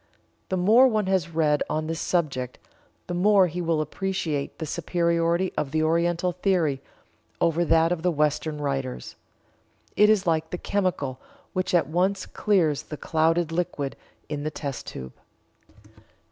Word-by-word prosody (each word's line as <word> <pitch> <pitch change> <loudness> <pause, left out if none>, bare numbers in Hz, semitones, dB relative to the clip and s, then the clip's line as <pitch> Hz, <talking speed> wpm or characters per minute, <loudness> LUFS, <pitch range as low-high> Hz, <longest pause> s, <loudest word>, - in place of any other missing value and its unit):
The 185 - 0
more 220 +9 +6
one 215 -4 +1
has 190 -3 0
read 155 -3 +1
on 155 0 -1
this 160 0 -3
subject 135 -8 -1 0.5
the 175 - -5
more 195 +2 +5
he 180 +1 -3
will 165 -2 +1
appreciate 155 -3 -3
the 160 - -4
superiority 170 +2 0
of 145 - -1
the 155 +2 0
Oriental 170 +2 +1
theory 175 -6 0 0.6
over 170 +1 +2
that 165 0 +3
of 175 -2 -1
the 180 - +2
Western 150 -1 0
writers. 135 - -3 0.8
It 210 0 +5
is 210 -3 +3
like 160 -1 +1
the 180 - -4
chemical 175 -11 -1 0.3
which 185 -1 0
at 175 - +4
once 185 +4 0
clears 175 -9 +1
the 150 - -8
clouded 165 +2 +1
liquid 165 -5 -2 0.3
in 150 -1 -4
the 155 - -2
test 140 -3 -6
tube. 65 -1 -7
165 Hz, 150 wpm, -25 LUFS, 150-180 Hz, 0.8 s, more